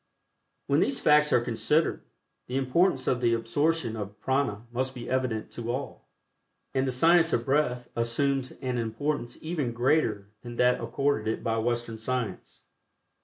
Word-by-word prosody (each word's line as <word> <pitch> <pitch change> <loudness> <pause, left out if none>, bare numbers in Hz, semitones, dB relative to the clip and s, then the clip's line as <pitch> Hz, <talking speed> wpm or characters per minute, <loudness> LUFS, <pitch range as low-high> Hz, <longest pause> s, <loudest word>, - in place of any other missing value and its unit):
When - - +2
these - - +1
facts 150 0 +4
are - - +5
considered, 135 +7 +1 0.5
the 125 - -2
importance 135 +1 +2
of 125 -1 0
the 120 -1 +3
absorption 120 +2 0
of 105 -1 -7
Prana 130 -5 -1
must 130 +2 -2
be 120 -1 -7
evident 125 -4 -1
to 120 0 -4
all, 135 +3 -6 0.7
and 135 0 +1
the - - 0
Science 165 +5 +4
of 115 - +1
Breath 130 -3 +1
assumes 130 +3 0
an 125 -2 -1
importance 120 +2 -2
even 155 -7 -2
greater 115 -5 +1
than 120 -1 -8
that 125 +1 +3
accorded 120 0 0
it 110 - -2
by 115 0 0
Western 120 -1 -2
science. 125 0 -4
125 Hz, 155 wpm, -27 LUFS, 115-140 Hz, 0.7 s, are